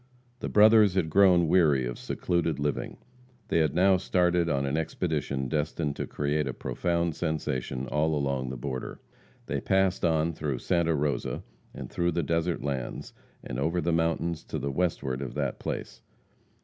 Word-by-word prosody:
The -, -, -4 dB
brothers 105 Hz, -2 st, +6 dB
had 80 Hz, -4 st, 0 dB
grown 90 Hz, -2 st, +5 dB
weary 75 Hz, -7 st, +4 dB
of -, -, -5 dB
secluded 85 Hz, -3 st, -1 dB
living. 70 Hz, 0 st, -2 dB, 0.5 s
They -, -, +2 dB
had 80 Hz, -3 st, +1 dB
now 95 Hz, +1 st, +5 dB
started 90 Hz, -2 st, +1 dB
on 70 Hz, -2 st, 0 dB
an 70 Hz, +1 st, -1 dB
expedition 75 Hz, -4 st, -2 dB
destined 75 Hz, 0 st, -1 dB
to -, -, -3 dB
create 75 Hz, 0 st, -1 dB
a 65 Hz, -, -4 dB
profound 85 Hz, -1 st, -1 dB
sensation 65 Hz, -4 st, -2 dB
all 75 Hz, +3 st, 0 dB
along 70 Hz, -3 st, -1 dB
the 65 Hz, -, -5 dB
border. 65 Hz, +1 st, -5 dB, 0.5 s
They -, -, -2 dB
passed 95 Hz, -1 st, +1 dB
on 80 Hz, -1 st, +2 dB
through 75 Hz, -4 st, -3 dB
Santa 85 Hz, +4 st, +1 dB
Rosa, 75 Hz, 0 st, -2 dB, 0.3 s
and -, -, -7 dB
through 85 Hz, -1 st, -1 dB
the 85 Hz, -, 0 dB
desert 85 Hz, +2 st, -1 dB
lands, 70 Hz, -4 st, -4 dB, 0.3 s
and -, -, -5 dB
over 80 Hz, +5 st, 0 dB
the 85 Hz, 0 st, 0 dB
mountains 80 Hz, 0 st, 0 dB
to -, -, -4 dB
the 70 Hz, -1 st, -2 dB
westward 65 Hz, -5 st, -1 dB
of 70 Hz, -, -5 dB
that 70 Hz, -4 st, -2 dB
place. -, -, -5 dB
80 Hz, 165 wpm, -28 LUFS, 70-85 Hz, 0.5 s, brothers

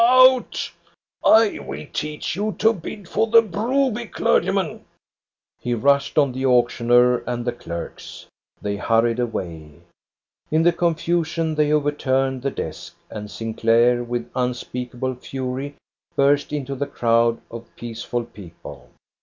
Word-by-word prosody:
Out! 255 Hz, +1 st, +5 dB, 0.5 s
I 220 Hz, -1 st, +5 dB
will -, -, -7 dB
teach 150 Hz, +1 st, -3 dB
you 210 Hz, +3 st, -2 dB
to 220 Hz, +2 st, +4 dB
bid 190 Hz, 0 st, -8 dB
for 225 Hz, -, +1 dB
the 230 Hz, 0 st, +6 dB
Broby 235 Hz, +3 st, 0 dB
clergyman! -, -, 0 dB, 0.4 s
" -, -, -64 dB
He 120 Hz, -1 st, -1 dB
rushed 140 Hz, +6 st, +2 dB
on 140 Hz, -3 st, +4 dB
the 130 Hz, +1 st, -4 dB
auctioneer 120 Hz, -1 st, +4 dB
and 120 Hz, -1 st, -3 dB
the 120 Hz, -, +1 dB
clerks. 85 Hz, -8 st, -8 dB, 0.3 s
They 100 Hz, 0 st, -3 dB
hurried 115 Hz, +2 st, +2 dB
away. 85 Hz, -10 st, -4 dB, 0.8 s
In 160 Hz, +1 st, +2 dB
the 175 Hz, 0 st, +4 dB
confusion 165 Hz, -1 st, 0 dB
they 150 Hz, -1 st, +2 dB
overturned 135 Hz, -3 st, +1 dB
the 140 Hz, -, 0 dB
desk, 80 Hz, -, -6 dB, 0.2 s
and 105 Hz, -1 st, -6 dB
Sinclair 115 Hz, +2 st, +2 dB
with 120 Hz, 0 st, -4 dB
unspeakable 125 Hz, 0 st, -3 dB
fury 130 Hz, +2 st, -5 dB, 0.4 s
burst 140 Hz, +1 st, +3 dB
into 140 Hz, -2 st, -3 dB
the 140 Hz, +1 st, -3 dB
crowd 115 Hz, 0 st, +2 dB
of 115 Hz, 0 st, -9 dB
peaceful 120 Hz, +1 st, -4 dB
people. 95 Hz, -7 st, -12 dB
130 Hz, 130 wpm, -22 LUFS, 120-160 Hz, 0.8 s, the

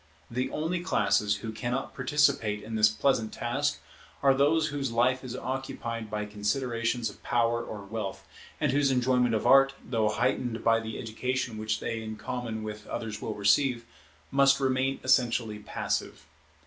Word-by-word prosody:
The 125 Hz, +2 st, -1 dB
only 165 Hz, +3 st, -2 dB
classes 105 Hz, -, +2 dB
who 110 Hz, -, -3 dB
cannot 120 Hz, +4 st, -3 dB
participate 125 Hz, -6 st, +1 dB
in 110 Hz, -, -7 dB
this 105 Hz, -1 st, +5 dB
pleasant 110 Hz, 0 st, +1 dB
task 135 Hz, +5 st, -1 dB, 0.4 s
are 135 Hz, -1 st, +6 dB
those 155 Hz, +3 st, +3 dB
whose 140 Hz, -4 st, -2 dB
life 125 Hz, +3 st, +2 dB
is 125 Hz, -1 st, -6 dB
occupied 120 Hz, -4 st, -4 dB
by 105 Hz, 0 st, -2 dB
considerations 115 Hz, +2 st, -1 dB
of -, -, -18 dB
power 120 Hz, 0 st, +1 dB
or 105 Hz, -2 st, -7 dB
wealth, 105 Hz, -1 st, -5 dB, 0.3 s
and 150 Hz, -3 st, +2 dB
whose 140 Hz, 0 st, +3 dB
enjoyment 125 Hz, -2 st, +2 dB
of 110 Hz, -, -1 dB
Art, 135 Hz, 0 st, +6 dB
though 110 Hz, -3 st, +1 dB
heightened 120 Hz, +1 st, -1 dB
by 115 Hz, 0 st, +4 dB
the 110 Hz, -1 st, -6 dB
education 120 Hz, 0 st, -3 dB
which 110 Hz, 0 st, -1 dB
they 115 Hz, 0 st, -3 dB
in 110 Hz, 0 st, -6 dB
common 110 Hz, 0 st, -4 dB
with 105 Hz, 0 st, -7 dB
others 110 Hz, -2 st, -5 dB
will 110 Hz, -, -4 dB
receive, 115 Hz, +4 st, +2 dB, 0.5 s
must 140 Hz, 0 st, +5 dB
remain 135 Hz, 0 st, +1 dB
essentially 120 Hz, -4 st, +2 dB
passive. 105 Hz, -, -3 dB
120 Hz, 160 wpm, -28 LUFS, 110-135 Hz, 0.5 s, are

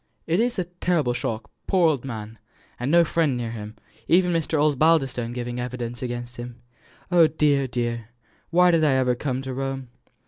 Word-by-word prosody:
"It 165 Hz, +4 st, +1 dB
is 240 Hz, +1 st, +1 dB
a 185 Hz, -, +1 dB
terrible 175 Hz, -6 st, 0 dB
shock 115 Hz, -2 st, -4 dB, 0.2 s
poor 185 Hz, -4 st, +4 dB
old 145 Hz, -6 st, 0 dB
man! 110 Hz, -4 st, -7 dB, 0.4 s
and 125 Hz, +2 st, -2 dB
no 170 Hz, +2 st, +6 dB
friend 155 Hz, -5 st, +1 dB
near 115 Hz, -2 st, -3 dB
him, 110 Hz, -1 st, -7 dB, 0.3 s
even 180 Hz, +1 st, +4 dB
Mr. 160 Hz, -2 st, 0 dB
Osbaldistone 145 Hz, -5 st, +2 dB
giving 120 Hz, 0 st, -4 dB
evidence 120 Hz, -1 st, -5 dB
again 120 Hz, -1 st, -3 dB
him. 120 Hz, 0 st, -9 dB, 0.5 s
Oh, 170 Hz, -2 st, +6 dB
dear, 145 Hz, -3 st, +2 dB
dear! 120 Hz, -2 st, -3 dB, 0.4 s
why 180 Hz, +1 st, +5 dB
did 165 Hz, -2 st, +3 dB
I 150 Hz, -3 st, +4 dB
ever 130 Hz, -1 st, +2 dB
come 130 Hz, +1 st, -3 dB
to 130 Hz, -1 st, -4 dB
Rome?" 135 Hz, -1 st, -4 dB
130 Hz, 175 wpm, -24 LUFS, 120-160 Hz, 0.5 s, no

